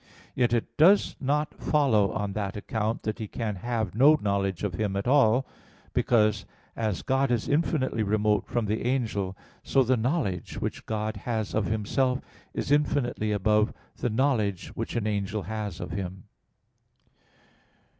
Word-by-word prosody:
Yet 120 -2 +2
it 120 -2 -1
does 185 +7 +5
not 150 +3 0
follow 120 -10 +2
on 100 -2 -2
that 100 -1 -3
account 110 +2 -2
that 110 +2 -3
he 110 - -4
can 105 -2 -3
have 110 -2 -2
no 140 +8 +6
knowledge 100 -2 -1
of 100 -4 -1
Him 100 +1 -1
at 100 +3 -2
all: 130 -2 +4 0.5
because, 110 -3 +2 0.3
as 110 -5 -2
God 135 0 +1
is 120 -3 0
infinitely 145 -6 +1
remote 105 -1 +1
from 120 -2 -1
the 105 +1 -1
angel, 105 -7 -1 0.2
so 135 - +3
the 130 +1 +2
knowledge 115 - -1
which - - -4
God 110 -1 -2
has 110 0 -3
of 110 -2 +1
Himself 125 +5 0 0.3
is - - -3
infinitely 135 -7 +1
above 105 +1 +2 0.2
the 120 - -1
knowledge 110 -7 0
which 115 - -5
an 115 -3 0
angel 105 -1 -1
has 105 -2 -4
of - - -5
Him. 95 0 -5
110 Hz, 155 wpm, -27 LUFS, 105-125 Hz, 0.5 s, no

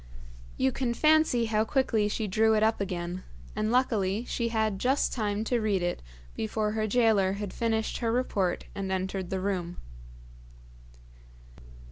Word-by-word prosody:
You 130 - +2
can 240 -3 -2
fancy 310 -6 +4
how 215 -1 +1
quickly 225 -4 +1
she 215 +1 -2
drew 220 +3 +3
it 215 - +2
up 220 -1 +2
again, 180 -2 -3 0.3
and 215 +1 0
luckily 225 -4 +1
she 235 -1 -1
had 220 -3 0
just 265 +5 +1
time 210 -2 -1
to 240 +2 0
read 200 -4 +1
it 175 - -2 0.3
before 210 - -1
her 215 0 -1
gaoler 215 -4 +3
had 200 -1 -5
finished 225 -1 -1
her 230 -2 0
report 205 -7 0
and 195 -1 -4
entered 190 -1 -2
the 190 - -2
room. 185 -3 -2
215 Hz, 150 wpm, -28 LUFS, 190-230 Hz, 0.3 s, fancy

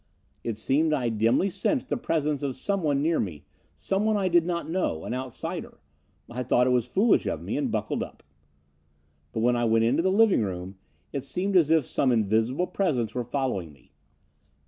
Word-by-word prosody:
It 115 -3 -3
seemed 155 +7 +1
I 125 -5 0
dimly 115 - +2
sensed 250 - -1
the - - +1
presence 150 - -1
of 135 -3 -2
someone 150 -4 0
near 165 +1 +2
me, 80 -8 -4 0.3
someone 210 +2 0
I 190 -2 +1
did 170 -1 +3
not 170 -1 -2
know, 160 - -1
an - - -3
outsider. 130 -1 -5 0.5
I 120 +2 -5
thought 125 0 +3
it 130 - +2
was 125 -1 +2
foolish 200 - +3
of - - -3
me - - -3
and - - 0
buckled - - -2
up. - - -8 1.1
"But 110 - -2
when 120 +1 +3
I 120 0 +1
went 115 0 +3
into 135 +8 +2
the 190 +2 +2
living 210 - +4
room, 95 -1 -5 0.3
it 140 - -3
seemed 190 +7 -2
as 165 -5 +5
if 160 -4 +4
some 130 - +1
invisible 115 - +1
presence 145 - -1
were 125 - -2
following 120 - -2
me. 70 - -24
135 Hz, 190 wpm, -26 LUFS, 115-175 Hz, 1.1 s, as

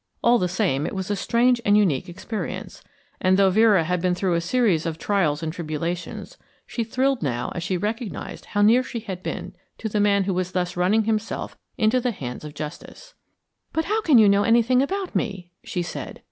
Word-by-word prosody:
All 240 0 +5
the 180 - +1
same 175 -6 0
it - - -5
was 190 +1 -3
a - - +1
strange 235 +4 +2
and 205 -1 +4
unique 180 -4 +1
experience; 205 +5 -6 0.4
and 185 0 +4
though 195 -1 +4
Vera 210 -3 +5
had 180 +2 -1
been 180 0 +1
through 185 -1 0
a 170 - +1
series 180 -4 +1
of 160 -1 -3
trials 165 -6 0
and 155 -1 -3
tribulations, 170 - -5 0.3
she 235 - -3
thrilled 260 +3 0
now 120 -6 -2
as 175 - -4
she 180 +1 -1
recognised 215 +3 -4
how 205 0 0
near 230 +4 +6
she 235 -2 -6
had 190 -4 -6
been - - -5 0.2
to 220 - -4
the 210 0 -1
man 200 -1 +3
who 190 0 -1
was 185 0 -2
thus 180 -1 -1
running 190 +5 +2
himself 220 0 -2 0.2
into 225 +3 +2
the 250 - 0
hands 130 - -6
of 150 -1 -9
justice. 170 - -8 0.6
"But 320 0 0
how 435 +2 0
can 305 - +5
you 215 -2 +7
know 200 0 +4
anything 235 +3 +4
about 380 +6 -2
me?" 190 -6 -3
she 180 - -3
said. 175 - -7
200 Hz, 205 wpm, -24 LUFS, 175-230 Hz, 0.6 s, you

